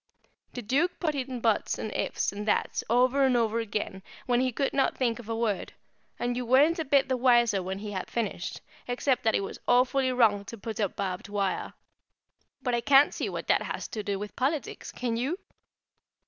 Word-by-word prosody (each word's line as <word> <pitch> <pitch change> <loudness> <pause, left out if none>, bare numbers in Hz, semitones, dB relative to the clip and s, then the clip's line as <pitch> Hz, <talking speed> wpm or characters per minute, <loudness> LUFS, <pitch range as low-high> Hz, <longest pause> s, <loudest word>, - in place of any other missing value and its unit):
The 245 - -6
Duke 285 - +1
put 315 -4 0
in 260 -3 -4
"buts" 225 -3 +1
and 220 - -4
"ifs" - - -1
and 205 +2 -6
"thats" - - +1
over 255 +4 +4
and 260 -2 +4
over 230 -1 +1
again 210 -3 -3 0.2
when 245 -2 +2
he 255 0 +1
could 275 +3 -1
not 270 - +1
think 235 -3 0
of 230 -2 -10
a 225 - -1
word, 225 -4 -1 0.4
and 245 0 -1
you 250 - -2
weren't 280 +8 +4
a 320 - -1
bit 280 -1 +3
the 260 - +1
wiser 240 -5 +4
when 190 +1 -4
he 210 +1 -6
had 190 -2 -4
finished, 215 -6 -3 0.3
except 250 +1 +1
that 220 - +3
it - - +1
was - - -6
awfully 255 +1 +3
wrong 220 -5 +3
to 230 - -8
put 225 +1 -6
up 200 -4 -1
barbed 190 0 -4
wire; 200 -2 -2 0.9
but 250 - 0
I 235 - +1
can't 275 +4 +5
see - - -2
what - - -5
that - - +3
has - - -4
to 215 - -4
do 200 -1 -2
with 205 +1 -7
politics, 275 0 -2
can 235 -2 -2
you? 275 +9 -1
240 Hz, 205 wpm, -28 LUFS, 210-260 Hz, 0.9 s, can't